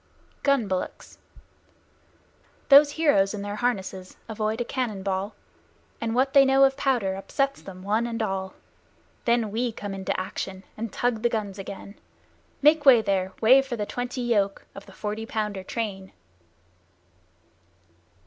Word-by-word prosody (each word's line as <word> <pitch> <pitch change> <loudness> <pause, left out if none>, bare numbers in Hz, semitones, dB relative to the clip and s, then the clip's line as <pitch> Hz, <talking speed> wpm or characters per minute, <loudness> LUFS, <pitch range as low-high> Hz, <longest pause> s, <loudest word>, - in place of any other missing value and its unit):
GUN 275 -6 +2
BULLOCKS 185 -1 -5 1.5
Those 290 +1 +8
heroes 215 -12 +2
in 200 - -5
their 205 0 -5
harnesses 190 -6 -3
avoid 220 0 -2
a 240 - -1
cannon 235 -7 -3
ball, 195 +2 -2 0.7
And 230 0 -2
what 265 +2 +2
they 275 - +8
know 270 0 +4
of 270 0 +4
powder 245 -9 0
upsets 275 +9 -2
them 185 -1 -11
one 215 +4 0
and 230 -1 -4
all; 190 -2 -3 0.7
Then 235 -3 +2
we 235 +3 -1
come 205 -2 -6
into 190 -1 -2
action 190 0 -5
and 225 -1 -5
tug 240 -3 -1
the 240 - +2
guns 205 -4 -3
again 200 +1 -9 0.6
Make 300 0 +5
way 250 -6 +7
there 190 -2 0
way 255 +5 +7
for 270 -2 -5
the 210 -2 -3
twenty 245 +3 -4
yoke 205 -5 0
Of 195 - -11
the - - -13
Forty 210 +3 -5
Pounder 210 -4 -3
train! 195 -3 -5
220 Hz, 150 wpm, -25 LUFS, 195-245 Hz, 1.5 s, Those